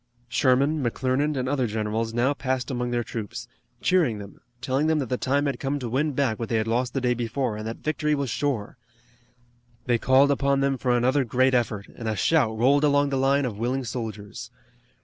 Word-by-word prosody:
Sherman, 135 +4 +2
McClernand 130 +4 0
and 130 0 -1
other 130 -2 0
generals 110 +1 -2
now 120 +5 +1
passed 130 -3 -2
among 125 -1 -2
their 120 0 0
troops, 110 -3 -6 0.3
cheering 165 - +2
them, 100 -1 -11 0.2
telling 130 +4 0
them 160 0 +2
that 135 -6 -2
the 125 - 0
time 140 +2 +1
had 140 -4 -2
come 140 +2 -1
to 130 -4 -4
win 140 +6 0
back 130 -5 0
what 115 - -4
they 115 - 0
had 110 -1 +1
lost 120 +3 -1
the 135 - 0
day 125 -1 +2
before, 120 0 -2
and 110 +1 -5
that 115 - -5
victory 150 0 0
was 140 -4 -2
sure. 130 -5 -2 1.1
They 120 -2 +2
called 135 +3 +4
upon 140 0 +1
them 135 0 +1
for 125 -2 +2
another 130 +3 +2
great 130 +2 +2
effort, 110 -5 0
and 115 - -8
a 110 - -1
shout 120 -5 +2
rolled 140 +5 +3
along 145 -1 +3
the 140 - -1
line 135 +1 +2
of 110 -4 -4
willing 130 +3 -1
soldiers. 110 -3 -6
130 Hz, 205 wpm, -25 LUFS, 115-140 Hz, 1.1 s, called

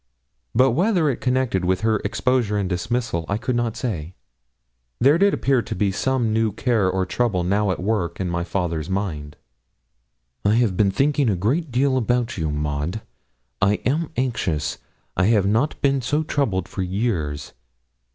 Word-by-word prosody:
But 130 +2 +5
whether 170 - +2
connected 125 -7 0
with 95 +1 +1
her 110 -1 +2
exposure 110 0 0
and 100 -2 0
dismissal, 110 +1 -2
I 100 - +1
could 120 +3 -2
not 120 -1 -1
say, 90 - -4 0.8
there 140 +6 +5
did 200 +1 +5
appear 135 -8 +1
to - - -5
be 100 -2 +1
some 120 +1 0
new 110 -1 +2
care 110 -2 +1
or 95 0 0
trouble 100 -2 0
now 100 +3 +1
at 95 - -1
work 90 -4 -1
in 95 - -1
my 85 0 -1
father's 85 -3 -2
mind. 80 -7 -3 1.1
'I 100 +2 +3
have 115 -5 +2
been 100 +1 +3
thinking 140 +4 +2
a 100 - +2
great 135 - 0
deal 130 +2 +2
about 120 0 0
you, 80 -4 -2
Maud. 75 +6 -2 0.6
I 100 +1 +4
am 155 +5 0
anxious. 110 - -1 0.4
I 95 - +2
have 105 -2 +3
not 115 +9 +1
been 140 -1 +3
so 145 +6 0
troubled 110 - -1
for 95 - -5
years. 90 - -2
110 Hz, 165 wpm, -22 LUFS, 95-125 Hz, 1.1 s, But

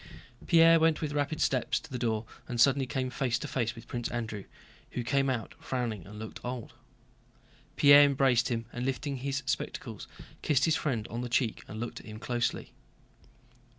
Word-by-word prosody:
Pierre 165 0 +7
went 160 -1 +3
with 150 -2 -3
rapid 145 +1 -1
steps 130 -3 +1
to - - -15
the 125 - -3
door 110 -2 -1 0.2
and 120 -1 -4
suddenly 135 +1 +4
came 130 -1 -2
face 130 -3 0
to - - -5
face 120 -3 -1
with 115 0 -12
Prince 120 -1 -3
Andrew, 110 -4 -4 0.5
who 125 - -2
came 135 +2 +1
out 120 -4 -3
frowning 115 -8 -3
and 105 +1 -10
looking 110 0 -8
old. 125 -2 -5 1.0
Pierre 145 0 +8
embraced 135 -3 +3
him 115 -2 -2
and 120 - -4
lifting 135 +2 -2
his 140 +2 -3
spectacles - - -4 0.3
kissed 140 -2 +2
his 160 - +3
friend 120 -10 -1
on 115 +2 -4
the 125 - -4
cheek 120 -1 0
and 110 - -7
looked 120 +1 -5
at - - -14
him 110 0 -8
closely. 120 +1 -2
125 Hz, 185 wpm, -30 LUFS, 115-140 Hz, 1.0 s, Pierre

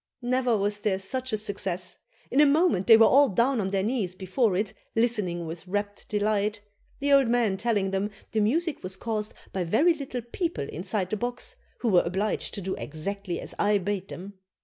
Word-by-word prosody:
Never 250 -2 +2
was 205 +1 0
there 205 -2 0
such 255 +7 -4
a 215 - +1
success. 190 -4 -3 0.3
In 275 - +5
a - - +7
moment 295 - +3
they 225 -2 +9
were 225 - +7
all 280 +3 +6
down 235 +4 +2
on 190 - -1
their 195 -1 0
knees 210 -5 -1
before 190 +3 +1
it 210 +2 -1 0.2
listening 210 -7 0
with 165 +3 -7
rapt 205 +2 -3
delight, 210 0 0 0.4
the 285 0 +2
old 275 -3 +6
man 230 -4 +2
telling 200 -2 0
them 195 +2 0 0.2
the 220 - +1
music 300 +9 +1
was 185 +1 -5
caused 215 -2 -3 0.2
by 190 - -1
very 280 - +4
little 270 -5 -5
people 325 - -3
inside 185 +2 -2
the 215 - 0
box, 245 - -3 0.3
who 235 - +1
were 180 -4 +6
obliged 190 +5 -1
to 200 - -4
do 190 +1 -2
exactly 180 +4 -4
as - - -6
I 205 0 +3
bade 195 0 -3
them. 190 +2 -9
210 Hz, 195 wpm, -27 LUFS, 190-240 Hz, 0.4 s, they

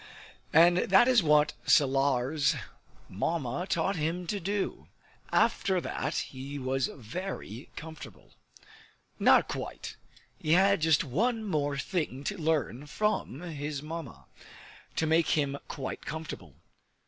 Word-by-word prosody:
And 170 +2 +6
that 195 +6 +5
is 250 -4 +5
what 150 -2 +4
Salar's 140 0 +3 0.5
Mamma 145 - -2
taught 185 +4 0
him 165 +3 -2
to 200 +4 -2
do. 200 +3 -3 0.4
After 190 -2 +2
that - - -3
he 135 +2 -5
was 130 -1 0
very 125 - -7
comfortable. 160 -5 -10 0.9
Not - - +5
quite; - - -6 0.4
he 155 - +1
had 195 0 +4
just 160 -2 +4
one 220 - 0
more 145 -8 -1
thing 140 -3 -2
to 205 - -2
learn 150 - -1
from 210 - -1
his 150 -4 -5
Mamma, 160 -4 -7 0.7
to 160 - +1
make 160 +1 +3
him 140 -1 0
quite 135 -2 -5
comfortable. 155 - -7
155 Hz, 120 wpm, -29 LUFS, 140-180 Hz, 0.9 s, And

